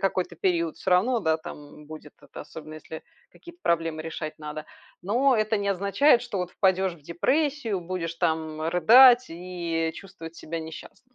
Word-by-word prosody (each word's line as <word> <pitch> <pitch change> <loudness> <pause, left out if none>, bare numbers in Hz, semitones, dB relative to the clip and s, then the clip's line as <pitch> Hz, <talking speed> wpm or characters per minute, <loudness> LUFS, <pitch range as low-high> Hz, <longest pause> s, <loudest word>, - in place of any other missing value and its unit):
какой-то 185 -2 -1
период 170 -2 0
всё 190 - -3
равно, 225 +7 +3
да, 160 -4 +1
там 150 -1 -11
будет 155 -1 -11
это. - - -11
Особенно 155 -1 -10
если 160 +1 -9 0.3
какие-то 345 0 -15
проблемы 165 -2 0
решать 155 -1 -6
надо. 150 0 -7 0.4
Но 245 +7 +2
это 215 0 +1
не 200 0 -2
означает, 200 +8 +3
что 240 -5 -5
вот 180 -1 -3
впадешь 190 -1 +1
в 160 - -20
депрессию, 250 - -1
будешь 170 -1 -4
там 160 -2 -1
рыдать 245 +9 +7
и 170 -2 -3
чувствовать 170 -4 -11
себя 165 0 -6
несчастным. 160 +10 -11
175 Hz, 160 wpm, -26 LUFS, 160-205 Hz, 0.4 s, рыдать